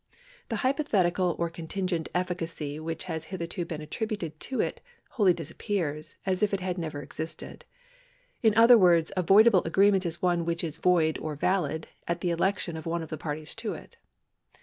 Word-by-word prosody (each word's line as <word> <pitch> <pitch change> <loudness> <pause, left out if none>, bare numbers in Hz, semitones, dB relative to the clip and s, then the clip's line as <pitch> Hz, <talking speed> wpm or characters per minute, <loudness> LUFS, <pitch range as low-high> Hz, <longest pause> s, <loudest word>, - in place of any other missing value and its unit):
The 230 - -1
hypothetical 190 - +2
or 170 - 0
contingent 170 0 -3
efficacy 165 -5 -3
which 160 0 -4
has 160 -3 -4
hitherto 170 -1 -4
been 160 -2 -5
attributed 170 -1 -4
to 265 - -4
it - - -1 0.3
wholly 205 -7 +4
disappears, 160 -2 -3
as 185 0 +1
if 205 -1 +2
it - - -3
had 180 -1 -3
never 155 -3 -4
existed. 155 +4 -7 0.8
In 220 -3 +3
other 230 +1 +8
words, 170 -4 +4
a 185 - +2
voidable 195 +2 +6
agreement 195 +2 +3
is 170 0 -5
one 175 -2 +1
which 170 0 -1
is 160 -2 -3
void 165 -2 +2
or 155 -1 -4
valid 160 -1 0 0.2
at 170 0 -2
the 175 - 0
election 175 0 0
of 160 - -7
one 170 0 -1
of 160 - -9
the 155 - -3
parties 155 0 -4
to - - -3
it. - - -13
170 Hz, 175 wpm, -28 LUFS, 160-190 Hz, 0.8 s, other